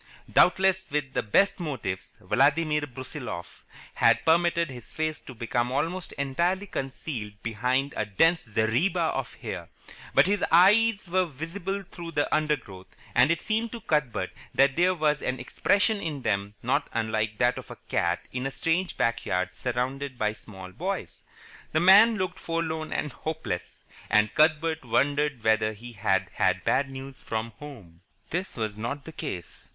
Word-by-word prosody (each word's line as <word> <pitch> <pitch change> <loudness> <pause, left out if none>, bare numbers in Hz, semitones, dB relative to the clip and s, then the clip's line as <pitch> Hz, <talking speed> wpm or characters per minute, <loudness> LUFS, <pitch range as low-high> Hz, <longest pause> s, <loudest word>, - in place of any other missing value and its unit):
Doubtless 190 +1 +4
with 140 -2 -2
the - - +1
best 195 - +2
motives, 130 - -4
Vladimir 150 +3 +2
Brusiloff 130 - -7 0.3
had - - +3
permitted 170 -1 +3
his 120 -3 -10
face 155 -1 -2
to 130 - -11
become 120 +1 -1
almost 165 +6 -2
entirely 170 +8 0
concealed 130 - -5
behind 125 +5 0
a 110 - -1
dense 165 - +3
zareba 120 - +1
of - - -4
hair, - - -6 0.5
but - - +7
his 200 0 +1
eyes 205 +4 +5
were 185 +1 +2
visible 175 +7 -4
through 170 -2 -9
the 145 0 0
undergrowth, 140 -12 -2 0.3
and 125 +3 +5
it 170 -1 0
seemed 225 +1 -1
to 235 - -6
Cuthbert 125 - 0 0.2
that 135 -1 +4
there 180 +1 +3
was 150 -3 +1
an 130 -1 -2
expression 200 - +1
in 150 -5 -4
them 100 0 -1
not - - 0
unlike 110 -1 -1
that 120 +2 +2
of - - -12
a - - -9
cat 85 0 0
in 125 +1 -2
a - - -2
strange 165 +6 -1
backyard 95 -6 0
surrounded 130 +2 -3
by 105 -1 0
small 95 -3 -11
boys. 155 - -4 0.5
The 155 - +3
man 205 +6 +7
looked 185 -1 -3
forlorn 160 -1 -2
and 150 - -2
hopeless, 155 - -4 0.3
and 105 0 +3
Cuthbert 160 +1 +2
wondered 140 +1 +1
whether 110 0 +2
he 120 +3 -10
had 100 -3 +1
had - - +1
bad 135 +1 +2
news 135 0 -9
from 115 +1 -3
home. 100 - -11 0.3
This 180 -1 -3
was 110 -2 -3
not 135 +6 -4
the 160 - -7
case. 90 - -7
140 Hz, 155 wpm, -27 LUFS, 115-170 Hz, 0.5 s, but